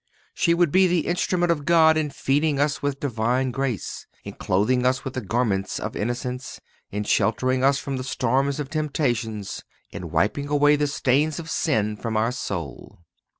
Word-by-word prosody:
She 170 -1 +2
would 170 -3 +2
be 190 +2 +5
the 175 -3 +1
instrument 175 0 +1
of 150 -4 -1
God 160 0 +5
in 155 -1 0
feeding 145 +1 0
us 145 0 +1
with 140 -1 -2
Divine 125 0 0
grace, 125 - -3 0.2
in - - -7
clothing 115 +7 +1
us 130 +3 +1
with 130 - -4
the 130 - -3
garments 105 -3 -1
of - - -5
innocence, 125 +3 -4 0.3
in 105 +1 -3
sheltering 130 +5 +1
us 135 0 +4
from 135 -1 -4
the 130 - -4
storms 135 +3 0
of 145 -1 -5
temptations, 120 - -2 0.3
in 85 - -7
wiping 100 - 0
away 145 0 +4
the 145 0 +1
stains 140 +1 +1
of 165 -1 -6
sin 110 -9 0
from 110 +1 -3
our 115 +2 +1
soul. 85 - -6
135 Hz, 175 wpm, -24 LUFS, 115-150 Hz, 0.3 s, be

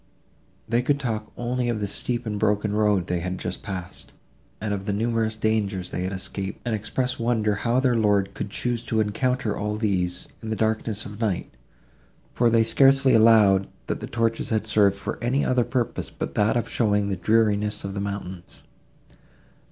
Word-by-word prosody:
They 120 +2 +2
could 140 +3 +1
talk 110 -5 -3
only 120 0 -1
of 115 -2 -1
the 105 - -1
steep 120 +4 -3
and 105 -2 -3
broken 105 0 +1
road 105 -4 +2
they 90 - -1
had 90 +2 -3
just - - -4
passed, 90 -2 -7 0.5
and 105 -1 -2
of 100 0 -4
the 100 - 0
numerous 110 0 0
dangers 105 -4 -1
they 90 - -2
had 95 - -2
escaped 95 0 -4
and 120 - -1
express 125 +4 -2
wonder 115 -3 +1
how 115 +5 +1
their 130 -2 +2
lord 100 -3 +2
could - - -5
choose 120 +2 -2
to 110 -1 0
encounter 115 +1 0
all 105 +1 -2
these, 95 -5 -1
in 110 - -6
the 110 - -1
darkness 110 -1 -1
of 105 0 -9
night; 105 - -2 0.8
for 120 -1 +3
they 115 0 +4
scarcely 135 +3 +4
allowed, 110 -4 +5 0.2
that - - -3
the - - -6
torches 115 -1 -1
had 110 -1 0
served 105 -2 +3
for 100 - -5
any 130 +4 +1
other 125 -1 +2
purpose 120 -1 -2
but - - -5
that 105 +3 +2
of 120 - -1
showing 105 -3 +1
the 95 - 0
dreariness 105 +2 +1
of 100 0 -4
the 100 - -3
mountains. 95 -3 -6
110 Hz, 185 wpm, -24 LUFS, 100-115 Hz, 0.8 s, allowed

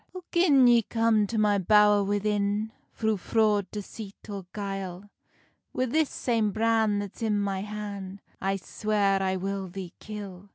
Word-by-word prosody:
"Oh, 365 - -7
gin 300 -7 +5
ye 240 -1 +6
come 225 -1 +2
to 225 - -3
my 210 -1 +3
bowr 210 +1 +5
within, 205 +1 0 0.2
Thro 220 -1 0
fraud, 210 0 +1
deceit, 210 0 -8
or 195 -3 -6
guile, 195 -1 -5 0.6
Wi 255 - +1
this 315 0 +2
same 225 -4 0
bran 220 -1 +2
that's 205 +1 -6
in 215 -2 +1
my 195 -1 -1
han 200 -2 -6 0.2
I 195 0 0
swear 200 0 0
I 190 0 0
will 195 +1 -3
thee 185 -1 -8
kill." 200 -2 -8
205 Hz, 155 wpm, -27 LUFS, 195-220 Hz, 0.6 s, ye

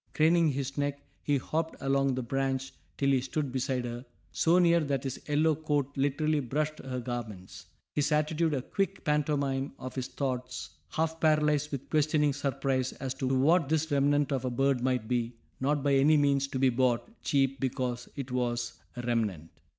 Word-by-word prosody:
Craning 165 +2 +4
his 140 +1 -3
neck 145 0 -2 0.2
he 145 -1 +1
hopped 160 +4 -2
along 135 -1 +1
the 130 - -2
branch 135 +1 -1 0.2
till 140 0 +2
he 130 -2 +3
stood 135 +1 -2
beside 130 -1 -1
her, 120 0 -5 0.3
so 160 - +3
near 170 -1 +5
that 140 -4 -1
his 135 -1 -4
yellow 155 +2 +3
coat 145 -2 -1
literally 145 +2 +1
brushed 150 +4 -2
her 130 -1 -4
garments, 105 -7 -6 0.3
his 145 +1 +1
attitude 155 +1 +1
a 130 - -2
quick 195 +4 -2
pantomime 140 -3 0
of 130 0 -7
his 130 -2 -3
thoughts, 125 -2 -4 0.2
half 160 +1 -1
paralyzed 150 -2 +2
with 140 -2 -5
questioning 150 -1 +3
surprise 135 -2 -1
as 130 -2 -4
to 130 0 -3
what 140 +4 +3
this 160 0 0
remnant 145 +1 +2
of 135 -2 0
a 130 - 0
bird 135 +1 +1
might 125 -3 0
be, 120 -1 -1 0.3
not 140 +1 +1
by 140 -1 +3
any 145 +3 +5
means 140 -1 +2
to 135 - -4
be 130 0 +4
bought 125 +2 +1
cheap 135 -1 +1
because 125 -2 -2
it 135 -3 -5
was 120 -1 -2 0.2
a 120 - -5
remnant. 105 -9 -1
135 Hz, 180 wpm, -29 LUFS, 125-150 Hz, 0.3 s, near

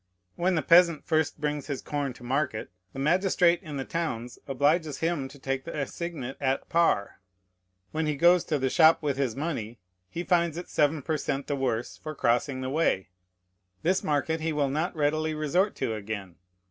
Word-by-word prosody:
When 180 +1 +1
the 160 - 0
peasant 170 0 +5
first 155 -1 0
brings 150 -1 -2
his 140 -3 -3
corn 145 -3 -2
to 125 - -15
market, 130 -4 -1 0.2
the - - -12
magistrate 175 +3 +3
in 150 -3 -6
the 135 - -3
towns 125 -8 -3
obliges 145 +3 +1
him 165 -5 -1
to 140 +2 -14
take 135 0 -3
the 165 - -6
assignat 140 -3 -4
at 135 -1 0
par; 165 - +2 0.7
when 155 0 -1
he 150 - 0
goes 175 +4 +5
to 155 - 0
the 135 -1 0
shop 160 -1 +5
with 140 -3 0
this 130 -5 0
money, 130 -7 -3 0.3
he 170 - -4
finds 170 -3 +1
it 175 - -6
seven 150 -1 +1
per 155 +2 0
cent 140 -1 -2
the 145 - -1
worse 125 -4 -2
for 155 0 -7
crossing 130 +2 +1
the 130 0 -3
way. 135 - +1 0.7
This 185 +3 +2
market 155 +2 0
he 160 +1 0
will 145 -2 +1
not 155 +6 -1
readily 155 +1 0
resort 175 +7 +1
to 110 - -2
again. 100 -4 -6
150 Hz, 185 wpm, -27 LUFS, 135-165 Hz, 0.7 s, peasant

